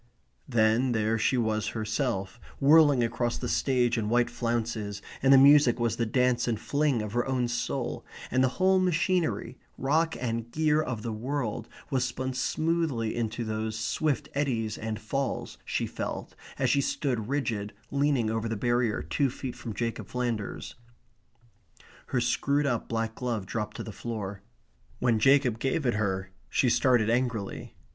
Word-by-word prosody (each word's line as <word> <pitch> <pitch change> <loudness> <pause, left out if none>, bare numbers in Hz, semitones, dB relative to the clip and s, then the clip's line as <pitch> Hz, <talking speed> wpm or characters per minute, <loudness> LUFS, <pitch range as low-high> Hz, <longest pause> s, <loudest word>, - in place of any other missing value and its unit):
Then 120 +1 +3
there 110 0 +1
she 130 +4 +2
was 110 -2 0
herself, 110 -3 -2 0.2
whirling 145 -3 +6
across 120 +1 -1
the - - -4
stage 125 -3 +1
in 105 -1 -2
white 120 +1 +2
flounces, 115 -3 -2 0.2
and 135 - +4
the 135 - +9
music 140 -2 +6
was 115 -1 0
the 115 - 0
dance 125 +1 +2
and 115 -3 0
fling 140 -3 +1
of 105 0 -6
her 120 0 +2
own 130 -2 0
soul, 120 +2 -3 0.3
and 130 +1 +3
the - - +5
whole 190 0 +4
machinery, 170 - 0 0.2
rock 160 +5 +1
and 115 -1 -3
gear 155 +2 +2
of 115 -8 -4
the 115 - -3
world 120 +1 -3 0.2
was 130 -2 +2
spun 130 +1 -3
smoothly 155 -4 0
into 115 0 -2
those 110 0 -3
swift 140 +6 -1
eddies 120 -7 -1
and 110 -1 -4
falls, 135 +5 -3
she - - -1
felt, - - -5 0.2
as - - +2
she 140 - +3
stood 125 -6 -1
rigid 115 -8 -1 0.2
leaning 140 -5 +1
over 115 0 -2
the 115 - -1
barrier 120 -6 +1
two 80 - +1
feet 130 0 -6
from 115 - -6
Jacob 115 +2 -3
Flanders. 120 -4 -3 1.3
Her 130 - 0
screwed 140 +4 +1
up 120 -5 -1
black 115 -1 -1
glove 115 -5 -3
dropped 105 +1 -4
to - - -4
the 110 - -7
floor. 100 -3 -5 0.6
When 120 -3 +2
Jacob 135 -1 +4
gave 135 +4 -1
it 120 - +2
her, 95 -3 -1 0.2
she 125 - +2
started 120 -4 +3
angrily. 115 -4 -2
120 Hz, 160 wpm, -28 LUFS, 110-135 Hz, 1.3 s, the